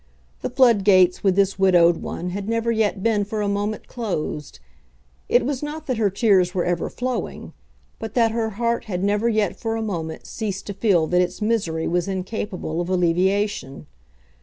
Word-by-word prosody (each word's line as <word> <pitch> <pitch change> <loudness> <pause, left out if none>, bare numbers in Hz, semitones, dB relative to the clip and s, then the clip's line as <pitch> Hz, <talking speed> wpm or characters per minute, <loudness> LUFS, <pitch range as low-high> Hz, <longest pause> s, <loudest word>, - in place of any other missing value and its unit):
The - - -2
floodgates 205 -8 +4
with 190 -2 +3
this 195 0 +1
widowed 175 -3 +5
one 180 +1 -5
had 200 +3 -4
never 230 0 0
yet 210 -3 0
been 220 -3 +2
for 210 +1 -3
a - - 0
moment 205 +1 -2
closed. 165 - -4 0.7
It 245 - +3
was 275 -1 -2
not 300 +1 -5
that 255 -5 -1
her 215 -2 +2
tears 190 -3 +2
were 180 - +1
ever 175 -1 -1
flowing, 250 0 -4 0.5
but 225 -1 -6
that 230 -2 +3
her 225 -1 -1
heart 235 0 0
had 185 -4 -3
never 205 +3 +1
yet 215 -4 +1
for 225 -1 -2
a 225 - -2
moment 165 -6 -4
ceased 205 -4 -4
to 200 - -5
feel 195 -5 +2
that 180 +2 +2
its 180 - -2
misery 200 -8 0
was 175 +1 0
incapable 185 -3 -3
of 175 - -4
alleviation. 185 -4 0
200 Hz, 180 wpm, -22 LUFS, 180-225 Hz, 0.7 s, widowed